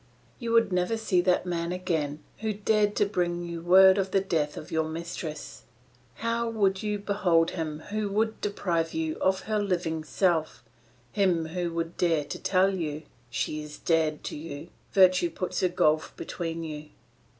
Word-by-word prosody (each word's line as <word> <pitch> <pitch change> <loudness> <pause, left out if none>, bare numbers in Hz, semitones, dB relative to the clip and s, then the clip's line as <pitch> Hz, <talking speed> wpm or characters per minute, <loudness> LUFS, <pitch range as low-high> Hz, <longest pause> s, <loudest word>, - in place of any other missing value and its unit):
You 235 -2 -3
would 230 -4 +4
never 180 +5 +1
see 195 -5 +2
that 180 0 +2
man 170 -1 -2
again 160 -5 -2 0.2
who 220 -1 -1
dared 210 0 +1
to 205 - +3
bring 175 -3 -1
you 170 -1 -5
word 190 +3 +7
of 190 0 0
the 195 - +3
death 160 -6 -1
of 155 +3 -8
your 160 -1 +1
mistress; 160 -1 -6 0.5
how 230 0 -1
would 195 -4 +1
you 210 -1 -1
behold 185 -5 +2
him 155 -3 -4
who 215 -1 -1
would 220 +2 0
deprive 170 -5 -1
you 160 -1 -1
of 190 0 +1
her 215 +1 -1
living 175 -5 -1
self, 165 -1 0 0.5
him 180 -5 +2
who 175 0 -2
would 165 0 -3
dare 165 -4 +2
to - - -6
tell 190 +1 +2
you, 155 -4 -3 0.3
'She 150 +5 -2
is 150 0 -9
dead 160 -2 +1
to - - -5
you, 150 +1 -7 0.2
virtue 185 -2 +5
puts 185 +2 -3
a 185 - +3
gulf 155 -3 +1
between 165 -1 -4
you'? 150 -1 -7
175 Hz, 170 wpm, -27 LUFS, 160-195 Hz, 0.5 s, word